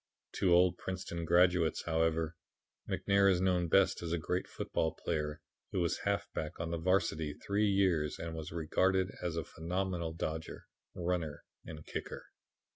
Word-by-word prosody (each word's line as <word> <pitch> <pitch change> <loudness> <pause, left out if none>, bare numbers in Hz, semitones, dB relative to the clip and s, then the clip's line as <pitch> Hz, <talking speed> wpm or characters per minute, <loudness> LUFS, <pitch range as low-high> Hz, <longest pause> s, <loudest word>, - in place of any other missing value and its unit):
"To 95 - +3
old 90 0 +5
Princeton 90 -3 -4
graduates, 85 -1 +3
however, 80 0 +1 0.5
McNair 100 0 +3
is 90 - +2
known 90 -2 +2
best 95 +3 +3
as 85 -1 -4
a 85 - +1
great 90 +3 -2
football 80 -1 -2
player 75 -3 -2 0.3
who 95 - -1
was 85 -2 0
halfback 75 -1 -2
on 85 0 -3
the 85 - -2
varsity 80 -4 +1
three 105 +1 0
years 95 -7 +2
and 85 0 -5
was 80 -1 -6
regarded 95 +3 +1
as 85 -2 -2
a 85 - -1
phenomenal 90 0 -3
dodger, 80 -1 -4 0.3
runner 85 -4 -2 0.2
and 75 -1 -8
kicker. - - -6
85 Hz, 150 wpm, -33 LUFS, 80-90 Hz, 0.5 s, old